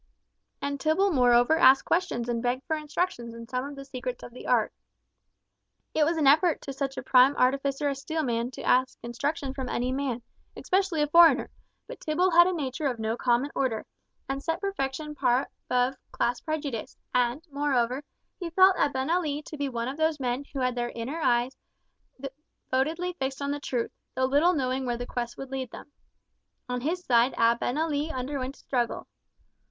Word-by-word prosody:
And 280 0 -2
Tibble 355 +7 +2
moreover 245 +2 +4
asked 270 -5 +6
questions 335 -10 0
and 235 -1 -1
begged 250 +2 -1
for 320 - 0
instructions 300 -6 -3
in 230 0 -9
some 250 +1 -2
of 285 0 -7
the 275 0 -9
secrets 255 -2 -6
of 240 - -10
the 250 - -9
art. - - +2 1.2
It 310 - +3
was 330 +2 0
an 310 - +1
effort 310 +4 +5
to 275 - -6
such 270 0 -3
a - - -4
prime 260 +2 +5
artificer 275 +2 +1
as 275 -1 -2
Steelman 250 -7 -1
to - - -8
ask 255 +1 +2
instruction 270 +4 -3
from 265 -2 -5
any 250 +1 -1
man, 260 -3 -2 0.3
especially 370 -5 +1
a - - +1
foreigner, 325 -3 +6 0.3
but - - -9
Tibble 355 +4 +1
had 345 +1 +7
a - - +1
nature 290 -1 -2
of 250 -3 -2
no 220 0 -1
common 245 +4 +1
order, 240 -5 -1 0.4
and 270 0 -3
set 325 +2 -2
perfection 300 -6 -3
far 260 -2 +1 0.2
above 250 +1 +2 0.2
class 240 +1 -1
prejudice; 290 -7 -4 0.2
and 250 +4 +1
moreover, 275 -2 0 0.4
he 350 -2 -4
felt 375 +2 +5
Abenali 290 +2 0
to - - -8
be 285 -2 -2
one 235 -2 -3
of 270 +3 -4
those 315 -1 +1
men 255 +1 -2
who 275 - -3
had 250 0 +1
their 240 0 -2
inner 240 +8 -5
eyes 245 -1 +2 0.6
devotedly 295 +4 -3
fixed 265 0 -2
on 280 0 -2
the 290 - -2
truth, 245 -4 -2 0.2
though 260 - +2
little 290 +7 +4
knowing 265 -3 -1
where 240 -1 -1
the 245 - -5
quest 240 -1 -4
would 270 -1 -8
lead 260 -2 -3
them. 290 - -11 0.8
On 250 0 -3
his 350 +6 -2
side 240 +1 +4
Abenali 285 +7 +1
underwent 260 0 -4
a - - -19
struggle. 245 -3 -2
270 Hz, 180 wpm, -27 LUFS, 250-305 Hz, 1.2 s, had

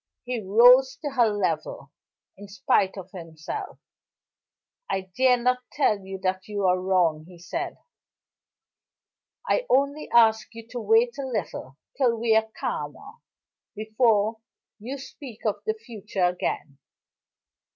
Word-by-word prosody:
He 245 -1 -2
rose 245 +6 +6
to 290 - -1
her 245 -4 +3
level, 165 -8 -3 0.4
in 205 +1 -11
spite 195 -1 +1
of 190 0 -9
himself. 165 -3 -7 1.1
"I 190 -1 -3
dare 255 -1 +4
not 250 +1 +1
tell 220 -8 +2
you 190 0 -7
that 185 0 -1
you 205 -2 -2
are 180 0 +2
wrong," 175 -5 +1
he 180 -1 -14
said. 335 - -5 1.7
"I - - +1
only 280 +3 +1
ask 220 -1 +3
you 230 0 -10
to 245 - -5
wait 450 - +2
a 270 - -3
little 170 - -5 0.2
till 245 -4 +2
we 225 -1 +2
are 220 0 +2
calmer, 420 +3 -5 0.6
before 220 0 +1 0.4
you 250 +6 -6
speak 260 -4 -11
of 215 - -1
the 435 - +1
future 215 - -3
again." 160 -5 -3
220 Hz, 130 wpm, -25 LUFS, 190-255 Hz, 1.7 s, rose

